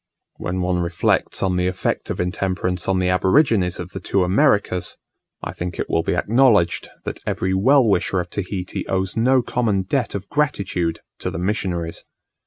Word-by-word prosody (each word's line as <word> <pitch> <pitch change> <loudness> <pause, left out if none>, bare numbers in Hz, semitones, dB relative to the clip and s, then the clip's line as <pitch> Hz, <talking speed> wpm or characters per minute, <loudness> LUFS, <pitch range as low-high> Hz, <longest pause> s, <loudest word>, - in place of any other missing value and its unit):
When 90 +1 -3
one 90 0 0
reflects 85 0 0
on 90 -1 +1
the 90 0 +1
effect 90 0 -2
of - - -3
intemperance 90 0 -1
on 95 -1 +2
the 90 0 +1
aborigines 95 - +3
of 90 +1 -6
the - - -6
two 100 - +1
Americas, 95 - +1 0.5
I - - -4
think 90 0 -5
it - - -3
will 80 - +2
be - - -1
acknowledged 110 -7 +3
that - - -5
every 95 +1 0
well 130 +6 +4
wisher 95 -1 +1
of 90 0 -4
Tahiti 95 -2 -4
owes 95 -1 -1
no 125 +2 +3
common 110 -6 0
debt 120 +5 -1
of 100 0 -5
gratitude 100 - -1 0.2
to - - -3
the - - -5
missionaries. 90 -3 -2
95 Hz, 175 wpm, -21 LUFS, 90-105 Hz, 0.5 s, well